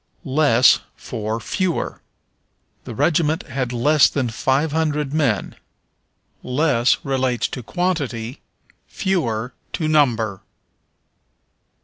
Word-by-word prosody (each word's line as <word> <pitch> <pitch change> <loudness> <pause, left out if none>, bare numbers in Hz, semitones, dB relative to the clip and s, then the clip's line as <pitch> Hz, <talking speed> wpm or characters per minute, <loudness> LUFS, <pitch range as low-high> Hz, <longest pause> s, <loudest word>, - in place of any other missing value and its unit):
Less 130 -3 +4 0.2
for 110 +1 -4
Fewer. 185 - -2 0.8
"The - - -7
regiment 160 -1 +1
had 130 -2 -3
less 145 +5 +4
than 130 -4 -1
five 135 +7 0
hundred 150 -2 -1
men." 135 -10 0 0.9
Less 125 -2 +2
relates 130 -3 0
to 125 - -6
quantity, 140 - -2 0.5
fewer, 125 - -1 0.2
to 155 - -1
number. 120 -10 +2
135 Hz, 90 wpm, -21 LUFS, 120-155 Hz, 0.9 s, Less